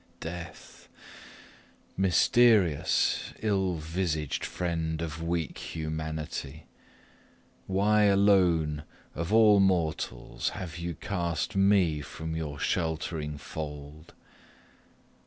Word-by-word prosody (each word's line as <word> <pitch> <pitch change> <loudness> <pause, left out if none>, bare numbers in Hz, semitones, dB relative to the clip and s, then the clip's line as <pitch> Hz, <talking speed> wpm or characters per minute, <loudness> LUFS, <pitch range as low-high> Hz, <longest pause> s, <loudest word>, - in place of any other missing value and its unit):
Death! 85 0 -9 1.1
mysterious, 95 -2 +3
ill 95 -4 +1
visaged 80 -2 -2
friend 80 -3 -2
of 80 -1 -5
weak 85 -1 -2
humanity! 80 -2 -5 1.0
Why 105 +2 +3
alone 90 -7 +3 0.3
of 85 +4 -4
all 110 -2 +6
mortals 85 -10 0
have 85 -2 -6
you 85 -1 -4
cast 85 +2 -3
me 95 -6 +3
from 80 +4 -6
your 75 -3 -4
sheltering 80 -2 -2
fold? 75 +1 -8
85 Hz, 85 wpm, -28 LUFS, 80-95 Hz, 1.1 s, all